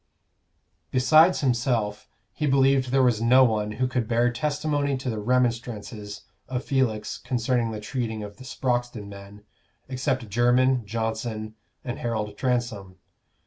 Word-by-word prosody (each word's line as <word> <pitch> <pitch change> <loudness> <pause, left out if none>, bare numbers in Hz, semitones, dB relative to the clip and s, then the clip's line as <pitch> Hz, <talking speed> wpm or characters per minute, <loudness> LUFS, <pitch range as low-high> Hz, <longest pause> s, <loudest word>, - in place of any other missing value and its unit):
Besides 155 +7 +5
himself, 120 -5 0 0.2
he 150 - -2
believed 135 -1 +3
there 135 +1 +3
was 120 -3 +2
no 125 +3 +6
one 105 -3 +1
who 130 +3 0
could 125 -3 -2
bear 120 +1 +2
testimony 145 +1 -1
to 130 -1 -3
the 110 - -3
remonstrances 115 -3 -2 0.2
of 125 -1 -4
Felix 120 -6 -1
concerning 120 -1 0
the 110 -1 -5
treating 110 0 -4
of 105 0 -9
the 130 - -11
Sproxton 120 -4 -2
men, 100 +1 -12 0.4
except 130 -2 -2
Jermyn, 120 +3 +2
Johnson, 110 0 -3 0.3
and 120 - -4
Harold 110 -3 -3
Transome. 120 -7 -2
120 Hz, 135 wpm, -25 LUFS, 110-130 Hz, 0.4 s, no